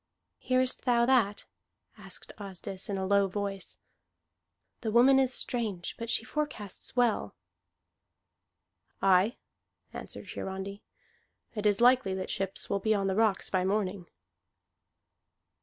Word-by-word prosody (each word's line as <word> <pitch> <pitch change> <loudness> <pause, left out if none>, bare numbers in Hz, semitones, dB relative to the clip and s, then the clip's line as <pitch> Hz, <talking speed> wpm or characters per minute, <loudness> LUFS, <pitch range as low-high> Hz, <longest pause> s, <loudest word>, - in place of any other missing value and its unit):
"Hearest 255 0 +1
thou 240 -2 +4
that?" 235 -6 +2 0.5
asked - - -6
Asdis 195 -1 -6
in 200 - -1
a 190 - -2
low 200 0 +3
voice. 195 0 -4 1.0
"The 225 - -3
woman 250 +4 +6
is 260 -1 +3
strange, 220 -9 -2
but 230 0 -5
she 235 - 0
forecasts 250 -8 -5
well." 245 -3 +1 1.6
"Aye," 195 +4 +3 0.6
answered - - -8
Hiarandi, 190 +1 -5 0.7
"it 210 -2 0
is 205 +2 +2
likely 245 -6 +4
that 190 0 -4
ships 195 0 -2
will 200 - 0
be 215 +2 +2
on 200 -1 0
the 190 -1 0
rocks 215 -3 +3
by 185 -1 +2
morning. 190 -2 -1
205 Hz, 125 wpm, -30 LUFS, 195-240 Hz, 1.6 s, woman